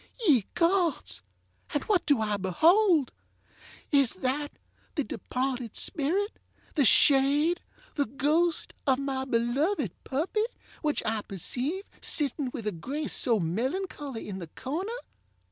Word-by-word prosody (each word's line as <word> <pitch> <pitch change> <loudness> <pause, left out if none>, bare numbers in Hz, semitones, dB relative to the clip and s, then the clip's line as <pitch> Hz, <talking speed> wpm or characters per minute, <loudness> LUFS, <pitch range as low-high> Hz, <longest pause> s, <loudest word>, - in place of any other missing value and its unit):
Ye 255 - +5
gods! 335 - +1 0.5
and 290 - +1
what 395 -5 +1
do 285 -6 +3
I 210 -1 0
beholdŌĆöis 320 - +4 1.1
that 290 +3 -1 0.4
the 295 - +1
departed 250 0 -3
spirit, 360 +8 +1 0.3
the 290 -4 +3
shade, 285 - +4 0.3
the 285 - 0
ghost, 305 +7 0
of 265 -1 +4
my 270 -1 -2
beloved 255 - 0
puppy, 340 +11 -1 0.4
which 300 -2 0
I 220 -1 0
perceive 255 - -3 0.2
sitting 285 -2 +1
with 230 -4 -6
a 210 - 0
grace 275 - -3
so 230 -4 +3
melancholy, 260 - -3
in 195 -2 -5
the 170 - -7
corner? 315 - -4
275 Hz, 120 wpm, -28 LUFS, 240-325 Hz, 1.1 s, Ye